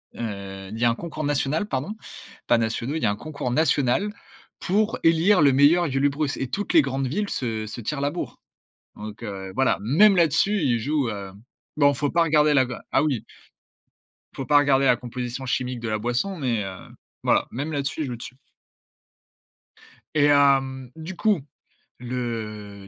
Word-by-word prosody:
heu, 100 -3 -6
il 110 - -6
y 120 - +2
a - - +5
un 115 - 0
concours 155 -1 -6
national, 145 +6 0
pardon, 145 +9 -3 0.5
pas 120 - +4
nationaux, 115 +5 -2
il 160 - -3
y - - +3
un 100 0 +1
concours 140 0 -5
national 150 +5 +2 0.5
pour 210 +4 0
élire 165 +3 +4
le 140 -2 +5
meilleur 155 +4 +4
Julebrus 140 +2 0
et 130 - -3
toutes 205 +8 -3
les 160 - +7
grandes 135 -1 -2
villes 205 +9 -2
se 110 -4 -3
se 110 +3 -7
tirent 140 +5 -3
la 145 +1 0
bourre. 175 - -6 0.6
Donc, 105 +2 -9
heu, 95 -3 -6
voilà. 135 - +2
Même 190 - +5
là-dessus, 175 +4 +2
ils 120 -4 +2
jouent, 140 0 0
heu 100 -2 -6 0.5
bon, 145 -1 +5
il - - -4
faut 145 +1 -1
pas 170 0 +3
regarder 150 -1 +3
la 130 -2 +4
ga 120 - -7
ah - - +3
oui, 140 -7 -1 1.1
faut 135 - -4
pas 145 +2 +4
regarder 135 -1 +4
la 125 -2 +5
composition 125 +1 -5
chimique 125 -1 -2
de 115 - -4
la 110 - 0
boisson, 120 - -1
mais, 120 -7 -1
heu, 95 -1 -6 0.5
voilà, - - +2
même 145 +6 -4
là-dessus, 140 +1 -2
ils - - -1
jouent 120 - -4
dessus 125 +2 -9 1.8
et 145 - +4
hem, 135 -3 +3
du 165 +3 -7
coup, 205 -7 +1 0.6
le, 110 -5 -5
135 Hz, 180 wpm, -24 LUFS, 120-155 Hz, 1.8 s, les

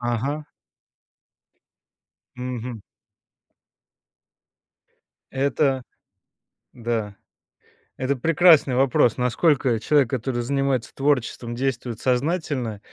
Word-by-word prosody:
Ага. 125 +6 -2 1.9
Мгм. 125 -3 -5 2.5
Это 135 0 +1 0.9
да. 115 -4 -3 0.8
Это 135 +2 0
прекрасный 160 -1 +4
вопрос. 125 -3 +3
Насколько 125 0 +2
человек, 140 +1 +2
который 120 -1 -2
занимается 135 -2 -1
творчеством, 125 -4 -1
действует 125 -3 -3
сознательно, 130 - -1
130 Hz, 65 wpm, -23 LUFS, 120-140 Hz, 2.5 s, прекрасный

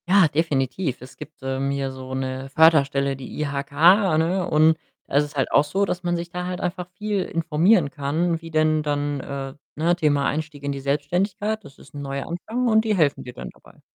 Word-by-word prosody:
Ja, 190 -2 +6
definitiv. 140 -2 -1
Es 125 +1 -12
gibt, 155 - -11
ähm, 135 +1 -1
hier 140 -1 -2
so 130 0 -8
'ne 130 0 -4
Förderstelle, 140 -3 +4
die 135 +2 -9
IHK, 140 -2 -3 0.5
ne, 175 +3 +1
und 155 +1 +4 0.3
da - - -5
ist 145 - +5
es 145 +1 -12
halt 135 - 0
auch 140 - +5
so, 195 +7 0
dass 180 -1 -3
man 175 0 0
sich 170 0 -5
da 180 0 -4
halt 180 0 -4
einfach 180 0 -3
viel 210 -2 -1
informieren 165 +1 +2
kann, 160 +3 -1
wie 165 - -9
denn 155 0 +2
dann 145 -1 -1
äh, 135 0 -5 0.2
ne, 170 +3 +2
Thema 145 -4 +1
„Einstieg 150 -1 -3
in 140 - -1
die 140 - -4
Selbstständigkeit“, 180 +10 -1
das 135 - -14
ist - - -17
'n 145 - -6
neuer 140 -1 -4
Anfang 225 +9 -2
und 220 -1 +4
die 215 -2 +1
helfen 155 -6 +1
dir 125 - -9
dann - - -8
dabei. - - -21
150 Hz, 210 wpm, -23 LUFS, 140-175 Hz, 0.5 s, Ja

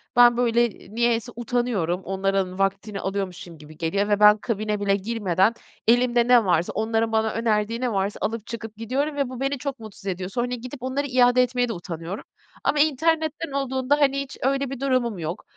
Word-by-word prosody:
ben, 240 -1 +7
böyle, 240 -1 +3
eee, 210 +1 -15
niyeyse 235 0 +1
utanıyorum, 230 -7 -1
onların 195 -1 -1
vaktini 195 +1 -1
alıyormuşum 190 -4 -4
gibi 155 +1 -14
geliyor 185 +5 0
ve 205 -1 +2
ben, 210 0 +7
kabine 215 -1 -2
bile 200 -1 +2
girmeden 200 -1 +1 0.3
elimde 240 0 +4
ne 245 -3 +6
varsa, 175 -2 +1
onların 225 +1 0
bana 220 0 +1
önerdiği 225 0 0
ne 250 -2 0
varsa 195 +1 -1
alıp, 225 +1 -3
çıkıp 225 -1 -7
gidiyorum 270 +7 -2
ve 280 -3 -1
bu 255 -1 -7
beni 275 +1 -1
çok 275 0 -5
mutsuz 215 -3 -12
ediyor. 185 -1 -3
Sonra 240 +5 -1
gidip 250 +2 -6
onları 270 +2 -1
iade 250 -1 +4
etmeye 245 0 0
de - - -1
utanıyorum. 170 +1 -6 0.4
Ama 300 - +1
internetten 315 +1 +1
olduğunda, 270 +1 0
hani, 275 -1 +3
hiç 275 0 -8
öyle 275 +1 0
bir 270 -2 -6
durumum 255 -6 0
yok. 165 +2 -4
230 Hz, 185 wpm, -24 LUFS, 200-255 Hz, 0.4 s, ben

